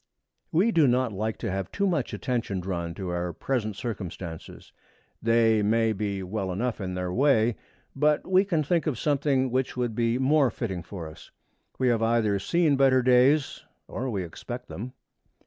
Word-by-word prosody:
We 190 Hz, +8 st, +3 dB
do 160 Hz, -8 st, +4 dB
not 125 Hz, -2 st, +1 dB
like 110 Hz, +3 st, -2 dB
to 115 Hz, -, -3 dB
have 95 Hz, -1 st, -3 dB
too 200 Hz, -, 0 dB
much 165 Hz, -9 st, 0 dB
attention 115 Hz, -6 st, -2 dB
drawn 85 Hz, -2 st, -4 dB
to 95 Hz, -1 st, -5 dB
our 90 Hz, 0 st, -2 dB
present 110 Hz, 0 st, -2 dB
circumstances. 95 Hz, -7 st, -7 dB, 0.5 s
They 115 Hz, -1 st, +3 dB
may 110 Hz, +2 st, +2 dB
be 100 Hz, -2 st, -3 dB
well 95 Hz, 0 st, -3 dB
enough 110 Hz, +4 st, -2 dB
in 90 Hz, -1 st, -4 dB
their 90 Hz, -1 st, -3 dB
way, 120 Hz, -3 st, +3 dB, 0.4 s
but 150 Hz, +2 st, +2 dB
we 185 Hz, +1 st, +4 dB
can 170 Hz, -6 st, 0 dB
think 170 Hz, +3 st, 0 dB
of 140 Hz, -6 st, -1 dB
something 140 Hz, -3 st, +1 dB
which 130 Hz, 0 st, -1 dB
would 120 Hz, -2 st, -1 dB
be 115 Hz, +1 st, +1 dB
more 135 Hz, +1 st, +3 dB
fitting 100 Hz, -6 st, -4 dB
for 85 Hz, -2 st, -8 dB
us. 80 Hz, -, -13 dB, 0.5 s
We 130 Hz, -1 st, +2 dB
have 115 Hz, -2 st, +1 dB
either 115 Hz, -3 st, +2 dB
seen 155 Hz, -, +2 dB
better 130 Hz, -2 st, +4 dB
days 130 Hz, +4 st, +3 dB, 0.2 s
or 130 Hz, +2 st, -4 dB
we 100 Hz, -5 st, -2 dB
expect 120 Hz, +8 st, -8 dB
them. 120 Hz, +6 st, -7 dB
115 Hz, 175 wpm, -26 LUFS, 100-135 Hz, 0.5 s, do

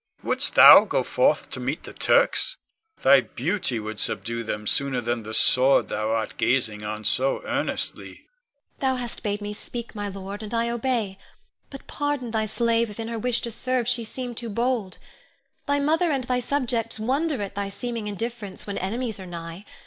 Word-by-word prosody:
Wouldst -, -, +2 dB
thou -, -, +10 dB
go -, -, 0 dB
forth -, -, +1 dB
to -, -, -5 dB
meet -, -, -3 dB
the -, -, -9 dB
Turks? -, -, +3 dB, 0.5 s
Thy 135 Hz, 0 st, +7 dB
beauty 145 Hz, -, -1 dB
would 110 Hz, 0 st, -6 dB
subdue 115 Hz, +1 st, +1 dB
them 105 Hz, -2 st, -5 dB
sooner 135 Hz, +3 st, +2 dB
than 120 Hz, 0 st, -2 dB
the 110 Hz, 0 st, -8 dB
sword 130 Hz, +4 st, +5 dB
thou 110 Hz, +1 st, -2 dB
art 110 Hz, 0 st, -2 dB
gazing 110 Hz, -5 st, +1 dB
on 105 Hz, 0 st, -5 dB
so -, -, +1 dB
earnestly. -, -, -1 dB
Ione. -, -, -17 dB, 0.6 s
Thou 265 Hz, -1 st, +1 dB
hast 245 Hz, -2 st, -6 dB
bade 205 Hz, 0 st, -3 dB
me 205 Hz, 0 st, -5 dB
speak, 235 Hz, +2 st, -7 dB
my 205 Hz, -2 st, -4 dB
lord, 195 Hz, +1 st, -7 dB
and 215 Hz, +2 st, -5 dB
I 230 Hz, 0 st, 0 dB
obey; 230 Hz, -5 st, -2 dB, 0.5 s
but 275 Hz, -, -11 dB
pardon 290 Hz, -5 st, -3 dB
thy 220 Hz, -1 st, -1 dB
slave 230 Hz, +1 st, +1 dB
if 210 Hz, -, -11 dB
in 225 Hz, 0 st, -4 dB
her 230 Hz, -1 st, -4 dB
wish 245 Hz, +1 st, 0 dB
to 235 Hz, -, -5 dB
serve 255 Hz, +1 st, -2 dB
she 245 Hz, -1 st, +1 dB
seem 245 Hz, +2 st, -6 dB
too 235 Hz, 0 st, -6 dB
bold. 230 Hz, -3 st, -1 dB, 0.7 s
Thy 285 Hz, 0 st, +1 dB
mother 320 Hz, +4 st, +2 dB
and 270 Hz, -3 st, -1 dB
thy 250 Hz, 0 st, -1 dB
subjects 240 Hz, -4 st, -2 dB
wonder 275 Hz, +6 st, -1 dB
at 200 Hz, -1 st, -5 dB
thy 200 Hz, 0 st, -3 dB
seeming 225 Hz, +2 st, -5 dB
indifference 210 Hz, -1 st, -6 dB
when 200 Hz, -1 st, -4 dB
enemies 220 Hz, +3 st, -3 dB
are 190 Hz, -, -9 dB
nigh. 170 Hz, +2 st, -8 dB
220 Hz, 185 wpm, -24 LUFS, 180-250 Hz, 0.7 s, thou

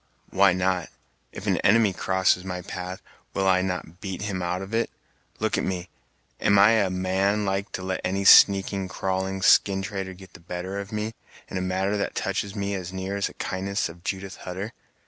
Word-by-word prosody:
"Why 100 Hz, 0 st, +5 dB
not! 90 Hz, -1 st, 0 dB, 0.4 s
If -, -, -8 dB
an -, -, +2 dB
enemy 105 Hz, -1 st, +4 dB
crosses 95 Hz, 0 st, +2 dB
my 90 Hz, -1 st, -5 dB
path, 90 Hz, 0 st, -6 dB, 0.3 s
will 95 Hz, -1 st, +1 dB
I 95 Hz, -1 st, +4 dB
not 90 Hz, -2 st, -4 dB
beat 95 Hz, -1 st, -5 dB
him 100 Hz, -3 st, -3 dB
out 90 Hz, +2 st, -2 dB
of 95 Hz, +3 st, -9 dB
it! 115 Hz, +1 st, +1 dB, 0.5 s
Look -, -, 0 dB
at -, -, -1 dB
me! 90 Hz, -1 st, -3 dB, 0.5 s
am 100 Hz, -, +4 dB
I 100 Hz, +2 st, +7 dB
a 105 Hz, -4 st, +3 dB
man 95 Hz, +3 st, +1 dB
like 95 Hz, 0 st, -1 dB
to 95 Hz, -, -4 dB
let 95 Hz, 0 st, -2 dB
any 95 Hz, +2 st, -1 dB
sneaking, 95 Hz, 0 st, +6 dB
crawling, 95 Hz, 0 st, -2 dB
skin 95 Hz, 0 st, +5 dB
trader 95 Hz, -1 st, -4 dB
get 95 Hz, +1 st, -14 dB
the -, -, -12 dB
better 90 Hz, +3 st, -5 dB
of 100 Hz, 0 st, -7 dB
me 110 Hz, +1 st, -3 dB, 0.4 s
in -, -, -4 dB
a -, -, -1 dB
matter 95 Hz, +2 st, 0 dB
that 100 Hz, -, -2 dB
touches 100 Hz, 0 st, -2 dB
me 100 Hz, -1 st, -2 dB
as 90 Hz, -2 st, -4 dB
near 95 Hz, +1 st, -4 dB
as 100 Hz, -, 0 dB
the -, -, -12 dB
kindness 100 Hz, +1 st, -2 dB
of 85 Hz, +1 st, -13 dB
Judith 95 Hz, -1 st, -4 dB
Hutter! 95 Hz, +5 st, -6 dB
95 Hz, 200 wpm, -25 LUFS, 95-100 Hz, 0.5 s, I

